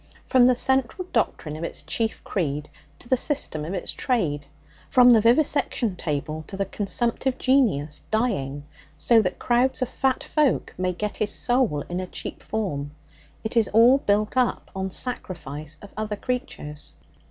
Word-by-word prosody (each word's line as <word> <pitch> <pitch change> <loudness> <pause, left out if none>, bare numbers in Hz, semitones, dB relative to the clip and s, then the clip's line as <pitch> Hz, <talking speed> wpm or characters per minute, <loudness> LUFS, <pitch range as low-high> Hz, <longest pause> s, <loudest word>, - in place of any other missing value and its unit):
From 250 -1 +5
the 255 - +4
central 265 +8 +1
doctrine 150 -1 -1
of 160 - -6
its - - -4
chief 225 -1 -1
creed 150 -5 -3 0.3
to - - -11
the 260 - +4
system 255 - +1
of 170 +6 -4
its 180 - -3
trade; 155 - -1 0.4
from 250 -1 +7
the 225 -2 +6
vivisection 245 -3 +2
table 155 -1 -3
to 195 - -7
the 195 - 0
consumptive 235 +6 -1
genius 200 - +1
dying 145 - -1 0.3
so 230 +7 +4
that - - -2
crowds 245 +2 +1
of 250 - -4
fat 265 -1 0
folk 300 -4 +1
may 185 0 -1
get 210 +4 -4
his 210 - 0
soul 245 - +1
in 175 +5 -4
a 185 - -4
cheap - - -6
form, 150 -10 -3 0.5
it 220 - -3
is 230 -3 +4
all 235 +5 +6
built 210 -2 +1
up 255 -2 0
on 190 0 -2
sacrifice 155 - -3
of 200 - -12
other 215 0 -3
creatures. 205 - -5
215 Hz, 165 wpm, -24 LUFS, 155-250 Hz, 0.5 s, from